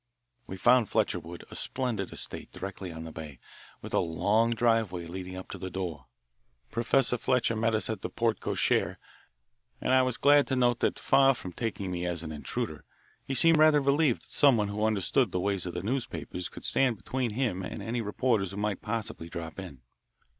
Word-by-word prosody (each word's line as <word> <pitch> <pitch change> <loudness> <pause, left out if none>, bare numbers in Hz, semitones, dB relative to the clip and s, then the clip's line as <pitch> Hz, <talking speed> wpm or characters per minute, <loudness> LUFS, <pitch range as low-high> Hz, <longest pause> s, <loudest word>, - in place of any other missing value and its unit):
We 95 - -6
found 120 +2 +4
Fletcherwood 85 0 -1
a - - -8
splendid 120 -7 -1
estate - - -4
directly 95 -1 -6
on 80 0 -7
the 80 - -7
bay, 75 -4 -8 0.5
with - - -8
a - - +4
long 105 +8 +2
driveway 115 -7 +1
leading 90 +2 -7
up 95 - -8
to - - -7
the 95 - -5
door. 90 -4 -5 0.6
Professor 125 +1 +2
Fletcher 120 -2 +1
met 110 0 +1
us 110 - -1
at 110 -3 -4
the - - -4
porte 115 -1 0
cochere, - - +1 0.8
and 130 - 0
I 130 - +6
was 130 -2 0
glad 145 0 +5
to 135 - 0
note 120 -2 +2
that, - - +1
far 135 -1 +4
from 95 -6 -8
taking 100 -4 -3
me 90 0 -2
as 85 -2 -2
an 80 - -6
intruder, 75 -1 -4 0.4
he 135 - -3
seemed 165 +4 +5
rather 155 -1 +6
relieved 140 -1 +2
that - - -15
someone 120 -8 +4
who 105 +1 -1
understood 110 +2 +2
the 90 - -1
ways 95 -1 -1
of 90 - -6
the 90 - -3
newspapers 110 -6 -3
could - - -11
stand 125 -5 +2
between 120 +4 -2
him 115 -7 -1
and 90 - -6
any 115 +1 -2
reporters 105 -2 0
who 100 - -7
might 105 -2 -2
possibly 105 -6 -3
drop 85 0 -6
in. 70 -10 -9
105 Hz, 195 wpm, -29 LUFS, 90-125 Hz, 0.8 s, I